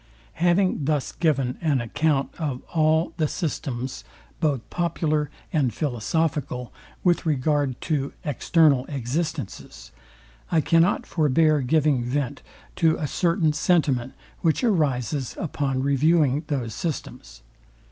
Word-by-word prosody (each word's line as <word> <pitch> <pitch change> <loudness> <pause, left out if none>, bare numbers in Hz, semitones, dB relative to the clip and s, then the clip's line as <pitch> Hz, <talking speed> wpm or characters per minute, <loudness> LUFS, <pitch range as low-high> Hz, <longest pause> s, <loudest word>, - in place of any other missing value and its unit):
Having 175 -3 +2
thus 150 -2 0
given 135 -6 0
an 150 -5 +2
account 145 +4 0
of 140 -6 -3
all 160 0 +2
the 155 -3 +1
systems 135 -6 -4 0.4
both 145 -7 0
popular 155 -4 0 0.2
and 140 -6 +2
philosophical, 135 +1 -2 0.3
with 175 -2 +3
regard 145 -2 +1
to 140 -4 -1
external 145 -1 +3
existences, 140 - -4 0.6
I 165 - +4
cannot 165 +5 +3
forbear 155 -1 +3
giving 145 -1 +2
vent 140 +2 -2 0.4
to 160 -2 +3
a 155 - -2
certain 165 0 +1
sentiment, 145 -6 +1 0.3
which 165 - +1
arises 145 - 0
upon 140 -6 -2
reviewing 145 +1 +2
those 125 -7 -2
systems. - - -6
150 Hz, 110 wpm, -24 LUFS, 130-160 Hz, 0.6 s, I